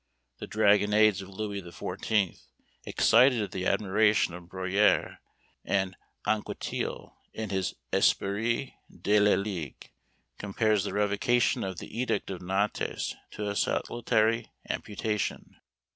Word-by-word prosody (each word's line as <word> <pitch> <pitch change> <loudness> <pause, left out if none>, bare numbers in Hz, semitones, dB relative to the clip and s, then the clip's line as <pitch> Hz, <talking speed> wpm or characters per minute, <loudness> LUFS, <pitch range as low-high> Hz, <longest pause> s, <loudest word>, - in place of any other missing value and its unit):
The - - -6
"dragonnades" 105 -1 +4
of 95 - -10
Louis 100 0 -4
XIV. 95 +3 -2 0.5
excited 115 -2 +4
the 95 -1 -2
admiration 105 -2 +2
of 90 0 -9
Bruyère; 95 +3 +1 0.5
and 95 -1 0 0.3
Anquetil, 110 -1 -3 0.2
in 110 -2 -5
his 95 -2 -1 0.2
"Esprit 115 +7 +1 0.2
de 105 +1 +2
la 105 0 +5
Ligue," 90 -7 -5 0.5
compares 105 0 +1
the - - -3
revocation 105 +4 +2
of 95 -2 -4
the 85 - -9
Edict 125 -4 -1
of 95 - -6
Nantes 95 +3 -1 0.2
to 105 - -5
a 100 - -2
salutary 115 +1 +1 0.2
amputation. 105 0 -3
105 Hz, 115 wpm, -28 LUFS, 95-110 Hz, 0.5 s, la